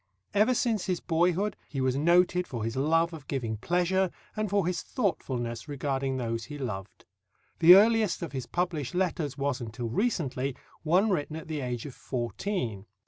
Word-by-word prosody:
Ever 215 +5 +4
since 225 -5 0
his 180 -2 0
boyhood 180 +5 +1
he 135 - -4
was 130 -1 +1
noted 175 +4 +3
for 120 -5 -4
his 115 +1 -2
love 165 +5 +2
of 150 -4 -10
giving 115 -6 -2
pleasure 180 - +1 0.3
and 215 -1 -1
for 200 -2 +2
his 180 -1 -1
thoughtfulness 125 - -2
regarding 135 -2 -2
those 115 -2 -2
he 145 +3 -7
loved. 105 -8 -6 0.5
The 170 +2 +10
earliest 215 -2 +4
of 165 - -4
his 130 -3 -5
published 170 -6 -2
letters 165 -6 -1
was 140 -2 -1
until 115 +1 -4
recently 140 - -1 0.3
one 185 +7 +3
written 155 -3 -1
at 160 - -7
the 155 -2 -3
age 125 -2 -3
of 140 - -7
fourteen. 120 - -3
150 Hz, 170 wpm, -28 LUFS, 130-180 Hz, 0.5 s, The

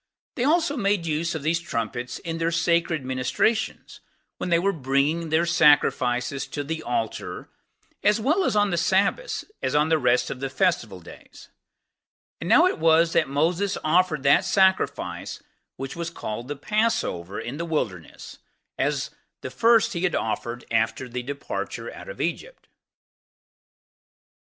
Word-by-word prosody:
They 245 - -2
also 315 -1 +2
made 200 -5 +1
use 165 +1 -1
of 155 - -5
these 165 +3 +1
trumpets 120 -5 -4
in 165 0 -5
their 165 0 +1
sacred 165 -3 +1
ministrations, 130 - -1 0.4
when - - -3
they 170 - +4
were 195 +4 +1
bringing 145 +3 0
their 160 +2 +2
sacrifices 140 -5 +2
to 145 +1 -4
the 160 +2 -4
altar 120 -5 -4 0.5
as 210 +2 +3
well 300 - +2 0.2
on 205 -1 +3
the 175 - 0
Sabbaths 195 - +1 0.2
as - - -1
on 150 +1 +3
the 160 -1 +3
rest 125 -2 +2
of 125 - -6
the 135 0 -3
[festival] 130 - 0
days; - - -14 0.9
and - - -5
now - - +7
it - - 0
was 165 +1 +4
that - - +2
Moses 175 +8 0
offered 155 -3 +2
that 140 - +5
sacrifice 190 -1 0 0.3
which 135 0 -6
was 170 0 -4
called 120 -7 -6
the 145 - -4
Passover 210 - -1
in 120 +5 -5
the 170 - -3
Wilderness, 105 - -4 0.4
as - - -1 0.3
the 130 - -6
first 230 - +3
he 170 - -3
had 185 -2 +1
offered 115 +2 -3
after 115 +3 0
the 125 0 -4
departure 140 - -5
out - - -10
of - - -9
Egypt. - - -4
160 Hz, 150 wpm, -24 LUFS, 130-185 Hz, 0.9 s, now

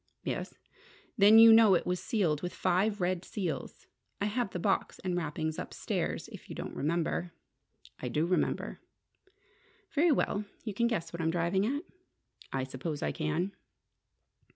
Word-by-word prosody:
"Yes." - - -4 0.6
"Then 210 0 +7
you 225 0 +10
know 220 -4 +7
it - - 0
was 180 0 -1
sealed 170 -10 +1
with 180 0 -4
five 195 +3 +1
red 180 0 0
seals. 200 -4 -4 0.3
I 200 - 0
have 215 +1 -1
the 185 - -5
box 175 - 0
and 180 -2 -3
wrappings 160 -1 -2
upstairs, - - -3
if - - -12
you - - -6
don't - - -6
remember." 170 +3 -1 0.7
"I - - -4
do 155 +2 0
remember." 180 +1 -1 1.1
"Very 320 +1 +3
well. 210 -6 0 0.2
You 215 - -4
can 235 +4 +2
guess 170 -8 -2
what 170 - -4
I'm 160 - +1
driving 175 +4 +1
at?" 285 +4 -2 0.7
"I 135 -1 -1
suppose 135 +3 -4
I - - 0
can." 160 +4 -1
180 Hz, 155 wpm, -31 LUFS, 165-210 Hz, 1.1 s, you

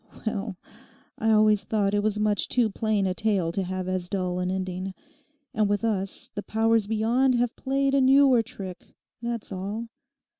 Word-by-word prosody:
—well, 205 -3 -3 0.6
I 225 - +1
always 215 -1 +4
thought 205 -2 0
it 205 - +2
was 210 0 0
much 210 -1 +1
too 235 -4 +2
plain 215 -1 0
a 185 - 0
tale 195 -5 0
to 195 - -1
have 185 0 -3
as 185 -1 -2
dull 180 -2 -1
an 180 0 -1
ending. 185 0 -3 0.6
And 215 -2 +1
with 205 0 0
us 195 -4 -2
the 205 - -4
powers 225 0 +1
beyond 235 +4 +2
have 240 -1 0
played 275 +1 0
a 275 - +4
newer 265 -2 +6
trick, 200 -6 -9 0.3
that's 235 -2 -4
all. 205 +5 -4
210 Hz, 175 wpm, -26 LUFS, 190-230 Hz, 0.6 s, newer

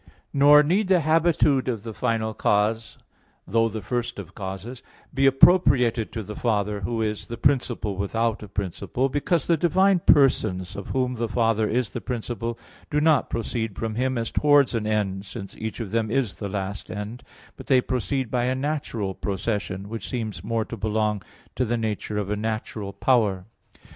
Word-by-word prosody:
Nor 145 +1 +7
need 185 +7 +1
the 185 -2 +4
habitude 155 -4 +3
of 115 -5 -3
the 115 -1 -6
final 110 -2 -1
cause 110 +2 0 0.5
(though 115 0 +2
the 110 -1 -6
first 120 +4 -2
of - - -8
causes) 100 +5 -6 0.3
be 135 +1 +3
appropriated 130 -6 +4
to 110 - -4
the 105 +2 -8
Father, 105 -3 0
Who 115 +3 -1
is 105 -1 -3
"the 115 - -6
principle 125 -7 +1
without 115 +3 -1
a 105 - -8
principle": 100 +7 -2
because 145 +3 0
the 170 - +3
divine 190 +3 +3
persons, 110 - +3
of 100 - -7
Whom 125 -1 0
the 115 -1 -3
Father 115 -1 +1
is 125 0 0
the - - -5
principle, 120 -1 -4 0.3
do 150 - +1
not 155 -2 +3
proceed 110 -2 -3
from 110 -1 -3
Him 130 +3 0
as 115 -1 -2
towards 145 -3 +4
an 110 -2 -1
end, 100 -2 -1
since 100 -4 -8
each 110 +1 -5
of 110 -5 -5
Them 110 -1 0
is 120 -5 -1
the 100 - -4
last 100 0 -4
end; 105 +3 -6 0.3
but - - -12
They 130 -4 +5
proceed 130 0 -2
by 125 -1 +1
a 130 +1 0
natural 130 -8 -2
procession, 100 -1 -3
which 115 +1 -6
seems 110 -8 -4
more 115 +1 -1
to 115 - -7
belong 105 0 0 0.3
to 130 - 0
the 120 0 0
nature 105 -1 -3
of 105 -1 -2
a - - +1
natural 110 -1 -4
power. 100 -3 +1
115 Hz, 180 wpm, -24 LUFS, 105-130 Hz, 0.5 s, Nor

